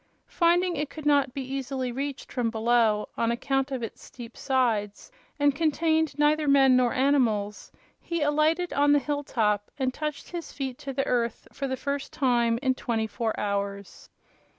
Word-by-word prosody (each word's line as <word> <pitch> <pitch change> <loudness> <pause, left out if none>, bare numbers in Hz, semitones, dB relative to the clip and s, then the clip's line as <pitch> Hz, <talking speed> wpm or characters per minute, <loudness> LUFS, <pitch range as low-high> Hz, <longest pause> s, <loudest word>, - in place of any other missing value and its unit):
Finding 350 +1 +2
it 295 0 -2
could 310 0 -10
not 285 -3 +3
be 270 +1 -5
easily 265 -1 -3
reached 275 +2 -5
from 245 -3 0
below, 225 -2 +2
on 230 - +2
account 270 +3 0
of 260 -3 -4
its 225 - -7
steep 235 -2 -11
sides, 230 - -1 0.3
and 290 -1 +4
contained 315 0 +1
neither 300 +1 +2
men 270 -2 +5
nor 250 -1 +3
animals, 235 -7 +1 0.3
he 335 -3 -2
alighted 310 +4 +1
on 290 +1 +4
the - - +6
hill 290 +1 -2
top 210 -6 0
and 260 -2 -1
touched 300 0 -5
his 345 -2 -6
feet 265 -3 -5
to 275 - -5
the 270 0 -1
earth 235 -2 -1
for 275 - -3
the 260 0 -3
first 280 +1 -3
time 240 -4 +2
in 260 -1 +3
twenty 230 -3 -2
four 220 +1 -3
hours. 200 -1 -4
265 Hz, 175 wpm, -26 LUFS, 235-290 Hz, 0.3 s, the